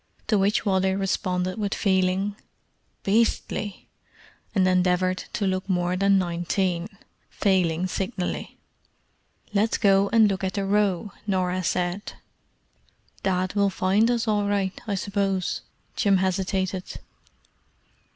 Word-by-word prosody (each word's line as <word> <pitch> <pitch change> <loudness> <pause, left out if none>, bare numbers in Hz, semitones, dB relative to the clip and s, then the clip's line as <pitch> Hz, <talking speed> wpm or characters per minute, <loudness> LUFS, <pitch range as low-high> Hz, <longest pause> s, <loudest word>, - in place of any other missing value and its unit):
To 215 - +2
which 200 +3 +1
Wally 190 -1 +2
responded 185 0 -1
with 205 -2 -1
feeling, 190 0 +1 0.7
"Beastly!" 210 -1 0 0.7
and 185 -2 +4
endeavoured 185 0 +1
to 205 - -1
look 190 +1 -1
more 180 -1 +1
than 195 +1 +3
nineteen—failing 180 0 -1
signally. 185 0 -3 1.0
"Let's 215 +2 +2
go 195 -1 +4
and 225 -2 +5
look 195 -1 -2
at 190 - -1
the 200 -1 -1
Row," 200 -1 +1 0.2
Norah 185 -1 0
said. 180 +3 -2 1.1
"Dad 185 -1 0
will 200 -1 +2
find 195 +4 +2
us 235 -1 0
all 205 -1 +1
right, 200 -2 0
I 205 - 0
suppose?" 195 -1 -1 0.3
Jim 200 -3 +3
hesitated. 190 0 -1
190 Hz, 110 wpm, -25 LUFS, 185-200 Hz, 1.1 s, and